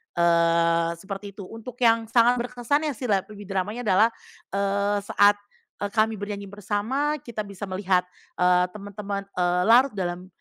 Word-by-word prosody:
eee, 170 0 +3
seperti 195 +2 -8
itu. 200 - -8
Untuk 225 +5 -9
yang 230 -1 +4
sangat 240 +2 +4
berkesan 250 +5 -1
ya, 290 - -2
sih 245 0 -3
la 195 - +4
lebih 210 -1 -10
dramanya 200 +4 -3
adalah, 215 +1 +4 0.5
eee, 200 +1 +1
saat 205 0 +4 0.4
e 205 - -1
kami 220 -1 +2
bernyanyi 205 0 -5
bersama, 215 +9 -1
kita 235 -2 -8
bisa 200 -1 -6
melihat, 185 -1 +1 0.3
eee, 180 0 +3
temen-temen, 200 -1 -5
eee, 180 -1 +1
larut 245 +5 +5
dalam 180 -1 -3
205 Hz, 155 wpm, -25 LUFS, 185-225 Hz, 0.5 s, larut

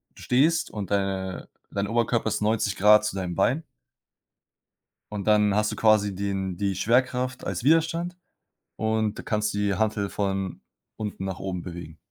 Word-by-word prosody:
du - - -14
stehst 150 +7 +2
und 100 -4 -5
deine 95 -2 -2 0.2
dein 100 0 -2
Oberkörper 115 0 +1
ist - - -2
90 105 -2 +1
Grad 105 +2 +6
zu 105 - -2
deinem 90 -2 -3
Bein. 130 - +2 1.5
Und 100 -2 -4
dann 105 -1 +4
hast 105 0 +2
du - - -4
quasi 105 -2 +3
den 95 -2 -2
die 100 0 -1
Schwerkraft 125 +4 +1
als - - -3
Widerstand 165 +4 +2 0.6
und 110 -1 0
da - - -7
kannst 105 0 -1
du - - -3
die 100 -1 +1
Hantel 105 -1 0
von 95 -2 -2 0.4
unten 105 -3 -4
nach 95 -1 -4
oben 95 -2 -4
bewegen. 85 -2 -8
105 Hz, 165 wpm, -26 LUFS, 95-110 Hz, 1.5 s, Grad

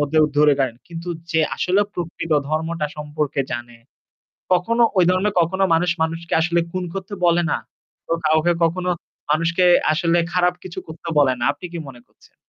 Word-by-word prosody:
মধ্যে 145 +2 +1 0.2
ধরে 150 -1 +6
নেন। 125 -3 0
কিন্তু 170 +1 -7 0.2
যে 160 - +3 0.2
আসলে 185 +3 +2
প্রকৃত 165 -1 -4 0.2
ধর্মটা 160 0 -1
সম্পর্কে 150 -1 -2
জানে 120 -1 -6 0.8
কখনো 230 +7 +2
ওই 185 - +6
ধর্মের 195 +3 +1
কখনো 190 +4 0
মানুষ 165 +1 +1
মানুষকে 165 +1 -3
আসলে 170 +1 +2
খুন 185 - -2
করতে 195 +1 -6
বলে 175 0 +3
না। - - +1 0.5
ও - - +4
কাউকে 155 +3 +3
কখনো 180 +2 0 0.4
মানুষকে 165 +3 +2 0.3
আসলে 170 +2 +2
খারাপ 180 0 +3
কিছু 185 0 -7
করতে 160 +1 -10
বলে 140 -3 +5
না। 120 - 0
আপনি 160 +5 -10
কি - - -4
মনে 120 -2 -13
করছেন? - - -26
165 Hz, 170 wpm, -21 LUFS, 155-180 Hz, 0.8 s, ধরে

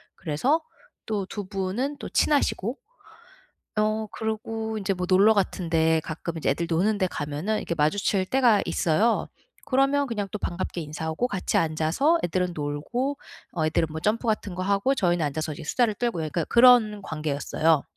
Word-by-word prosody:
그래서 245 - 0 0.5
또 205 -3 -2
2 205 -1 -5
분은 200 +9 -2
또 - - -6
친하시고. 270 -5 +1 1.0
어 215 +1 +1
그러고 220 0 -3
인제 200 -1 -1
뭐 180 -1 -3
놀러 200 +4 +6
같은 190 -4 -1
데 160 -1 +3
가끔 165 +1 -5
이제 160 - 0
애들 170 0 0
노는 195 +6 +2
데 190 -2 +1
가면은 150 +6 -3
이렇게 - - -3
마주칠 185 +5 +1
때가 240 -2 +3
있어요. 205 +7 +1 0.4
그러면 275 +1 +2
그냥 210 -5 -3
또 - - -1
반갑게 175 -1 -3
인사하고 160 +8 -3
같이 195 -5 -3
앉아서 165 - +2
애들은 180 +1 -1
놀고 170 - -2 0.4
어 160 -3 0
애들은 160 +1 +1
뭐 160 +1 -5
점프 225 +5 0
같은 210 -4 -1
거 185 - -3
하고 200 +7 +2
저희는 175 - +1
앉아서 155 +2 -3
이제 160 +2 -9
수다를 230 +7 +1
떨고 235 -5 -2
약간 155 +2 -2
그런 235 -4 +6
관계였어요. 155 -1 0
195 Hz, 345 characters per minute, -25 LUFS, 160-220 Hz, 1.0 s, 놀러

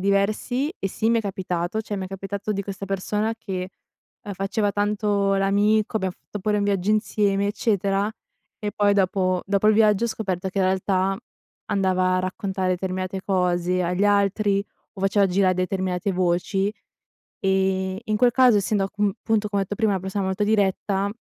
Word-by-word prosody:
diversi 210 - 0
e 195 - -2
sì, 220 +4 0
mi 230 - +3
è - - +1
capitato. 185 0 -2
Cioè 205 -1 -4
m'è 190 -1 -4
capitato 195 +2 -4
di 200 -1 -2
questa 195 0 -6
persona 210 +3 -1
che, 185 -4 -5 0.5
uhm, 205 - -6
faceva 200 +2 -1
tanto 205 -1 +1
l'amico, 205 +3 +2
abbiam 190 -3 -1
fatto 210 - -9
pure 210 +2 0
un 205 - 0
viaggio 200 0 0
insieme 205 -2 +1
eccetera, 200 -1 0 0.5
e 210 -1 -3
poi 205 -1 +3
dopo 185 -2 +1
dopo 200 +1 +1
il 215 - +5
viaggio 215 0 +4
ho - - +2
scoperto 190 -4 -3
che 195 - -4
in 190 - +3
realtà 190 +1 +1 0.5
andava 185 -2 +1
a - - +2
raccontare 185 0 -2
determinate 185 +1 -2
cose 180 -1 +1
agli 180 +3 0
altri, 200 0 +2 0.3
o 195 - -9
faceva 195 +1 +3
gira 185 0 +2
determinate 185 +1 -1
voci. 185 +3 0 0.7
Ehm, 190 0 +1
in 215 -2 0
quel 245 +1 +4
caso 250 -4 +5
essendo 200 0 0
a 195 - -5
cun 205 -1 0
punto 215 -1 +1
come 200 -1 0
ho - - -1
detto 205 +2 -5
prima 220 -3 +2
una 190 - -1
persona 190 +1 -3
molto 190 +2 -1
diretta, 200 -1 +1
195 Hz, 180 wpm, -24 LUFS, 190-210 Hz, 0.7 s, il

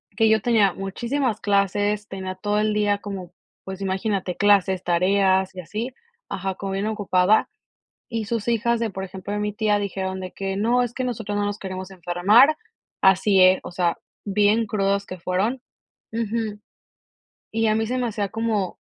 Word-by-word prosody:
Que 220 +1 +4
yo 220 -1 +4
tenía 210 -4 +3
muchísimas 235 +5 -2
clases, 205 +1 +1
tenía 190 -1 -5
todo 205 +2 -1
el 215 0 +1
día 205 -1 +1
como, 195 -4 -7 0.3
pues, 190 0 -7
imagínate 190 -1 -1
clases, 195 -2 +3
tareas, 190 +2 +2
y - - -7
así. 220 +8 -5 0.4
Ajá, 190 0 -3
como 195 -1 -4
bien 195 +2 -1
ocupada, 205 -1 +2 0.6
y 225 -2 -3
sus 225 0 -3
hijas 235 0 +1
de, 230 -1 -1
por 190 0 -6
ejemplo, 190 +1 -6
de 210 - -1
mi 210 -1 -2
tía 210 -1 +1
dijeron 190 -1 -3
de 185 -1 -6
que: 195 0 -4
"No, 240 +4 +2
es 240 -1 -4
que 255 - -3
nosotros 220 -4 -3
no 205 - 0
nos 205 0 -3
queremos 185 0 -6
enfermar", 190 - +4 0.4
así 190 +1 +4
es, 185 0 +6
o - - -7
sea, 175 -1 0 0.3
bien 210 +2 +3
crudas 200 -1 0
que 185 - -7
fueron. 195 +9 -1 0.5
Ujú. 220 -2 -2 0.9
Y 225 0 +1
a 215 - +3
mí 220 0 +1
se 255 - -1
me 250 -1 0
hacía 205 -3 -2
como 215 -4 -1
205 Hz, 180 wpm, -23 LUFS, 190-220 Hz, 0.9 s, es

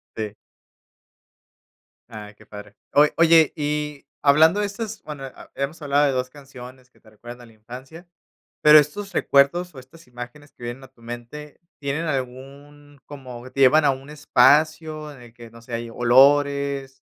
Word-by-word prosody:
Sí. 105 -2 -5 1.8
Ah, 105 -2 -10
qué - - -19
padre. 105 0 -12 0.2
Oy 150 +1 +5
oye, 165 -2 +5
y 150 -1 -4 0.2
hablando 160 +7 +4
de - - 0
estas, 215 +1 -7
bueno, 145 -3 -8
a 135 - -13
hemos 140 +4 -4
hablado 145 0 +2
de 140 - +1
2 125 0 -2
canciones 130 -2 -14
que - - -30
te 110 - -20
recuerdan 120 +3 -12
a - - -13
la - - -19
infancia, 130 - -12 0.5
pero 150 0 +8
estos 190 +7 0
recuerdos 175 +5 +2
o 135 - -11
estas 130 +6 -17
imágenes 125 +4 -11
que - - -17
vienen 120 +3 -7
a 130 - -14
tu 130 -3 -27
mente, 120 +7 -10 0.2
tienen 145 +4 -3
algún 140 +2 -7
como 130 -3 -11
te 135 - -3
llevan 150 +4 +5
a 140 - +4
un 135 +2 -8
espacio 150 +2 +1
en 130 - -16
el 120 -1 -15
que, 120 -1 -13
no 115 0 -16
sé, 120 +1 -12
hay 115 0 -4
olores, 140 +2 +2
140 Hz, 170 wpm, -22 LUFS, 125-150 Hz, 1.8 s, pero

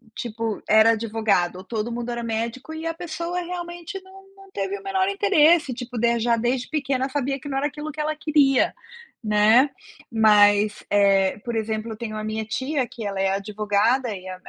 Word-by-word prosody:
tipo 225 -2 -4
era 220 +1 +6
advogado 220 -5 0
ou 185 - -9
todo 220 +1 -3
mundo 240 0 -4
era 235 0 -4
médico 230 +6 -4
e 320 +1 -6
a 330 - -1
pessoa 340 +1 -4
realmente 345 +1 -6
não 380 +1 -16
não 390 0 -17
teve 395 +1 -3
o - - -16
menor 380 -1 0
interesse, 345 -7 +4
tipo 245 0 -7
de 235 +1 +2
já 235 +1 +2
desde 245 +2 -1
pequena 275 -3 -1
sabia 275 0 -2
que 285 - -10
não 270 -1 -2
era 290 - 0
aquilo 300 +1 -6
que 305 +1 -5
ela 310 0 -1
queria, 295 -4 +3 0.5
né, 215 +5 +4 0.4
mas, 210 -1 +4
eh, 195 -1 +3
por 235 -1 -3
exemplo 220 0 -2
eu - - -5
tenho 220 -2 -5
a 215 - -4
minha 215 0 -3
tia 260 +4 -2
que 230 -2 -8
ela 200 -1 -3
é 195 - +2
advogada 210 +5 0
e 185 0 -10
a 185 - -5
240 Hz, 195 wpm, -23 LUFS, 215-305 Hz, 0.5 s, era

